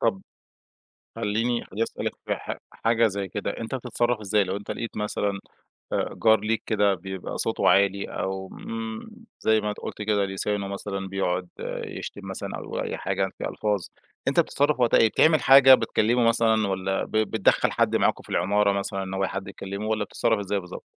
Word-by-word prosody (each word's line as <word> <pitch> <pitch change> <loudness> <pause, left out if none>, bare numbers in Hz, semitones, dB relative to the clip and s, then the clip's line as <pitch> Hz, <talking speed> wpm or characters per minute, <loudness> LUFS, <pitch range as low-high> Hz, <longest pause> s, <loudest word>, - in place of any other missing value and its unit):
طب 110 -5 +1 1.0
خلّيني 115 +2 -1
خليني 110 +4 -2
أسألك - - -3
في - - 0
ح - - -6
حاجة 115 0 +2
زي 100 -1 -3
كده 100 +1 -3
أنت 115 +3 -4
بتتصرف 120 -1 0
إزاي 105 0 +2
لو 95 +1 -3
أنت 100 - -7
لقيت 115 - -5
مثلًا 105 -1 -1 0.5
آآ - - 0
جار 110 -1 +6
ليك 110 +1 -1
كده 105 -3 +3
بيبقى 95 +1 -6
صوته - - +1
عالي، 100 0 +3
أو 95 0 -4
آمم، 115 - -6 0.3
زي 110 0 +3
ما 105 0 -2
قلت 105 - -7
كده 105 -1 +1
لسانه 100 +1 -2
مثلًا 100 -1 -4
بيقعد 90 -2 -1 0.4
يشتم - - -7
مثلًا - - -5
أو - - -5
أي - - -3
حاجة 95 0 -1
في - - -5
ألفاظ، 105 -3 -1 0.5
أنت - - +4
بتتصرف 145 -1 +1
وقتها 120 - +4
إيه؟ 115 - +6
بتعمل 155 +5 +4
حاجة، 135 0 +9
بتكلمه 115 0 +2
مثلًا، 110 -2 +3
والّا 95 0 -1
ب - - -14
بتدخل 110 -1 +2
حد - - +2
معاكم - - +1
في - - -19
العمارة 100 +3 +2
مثلًا 100 0 -2
إن 95 0 -5
هو 95 0 0
حد 100 +1 -5
يكلمه، 100 +2 -6
والّا 110 -1 0
بتتصرف 115 0 0
إزاي 100 0 -1
بالضبط؟ 90 0 -9
105 Hz, 180 wpm, -25 LUFS, 95-115 Hz, 1.0 s, حاجة